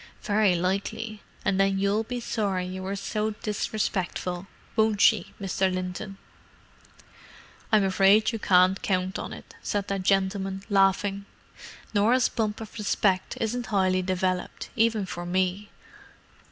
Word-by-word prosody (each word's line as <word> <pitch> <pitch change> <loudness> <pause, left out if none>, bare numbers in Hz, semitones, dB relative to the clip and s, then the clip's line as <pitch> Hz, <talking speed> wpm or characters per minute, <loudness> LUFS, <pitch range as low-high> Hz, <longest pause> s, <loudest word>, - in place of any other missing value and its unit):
"Very 205 -3 +3
likely, 200 +4 -2 0.2
and 190 - +1
then 195 0 +3
you'll 200 +2 +1
be 245 +2 -4
sorry 200 -6 -1
you 185 +1 -6
were 190 +1 -3
so 210 +2 -2
disrespectful, 195 -3 -2 0.3
won't 220 -2 +2
she, 205 -3 +3
Mr. 190 -1 0
Linton?" 185 +2 -4 1.5
"I'm 215 -2 +5
afraid 195 +3 +4
you 225 - -4
can't 185 0 +4
count 185 -1 -1
on - - -5
it," - - -11
said 205 -1 -2
that 195 -1 -1
gentleman, 195 0 0
laughing. 195 0 +2 0.7
"Norah's 230 +5 +3
bump 215 -2 -2
of 220 0 -8
respect 195 -2 +1
isn't 235 +2 -2
highly 185 -2 +2
developed, 185 0 -2
even 225 -3 +2
for 175 -1 -6
me. 185 +3 -1
195 Hz, 130 wpm, -26 LUFS, 185-215 Hz, 1.5 s, I'm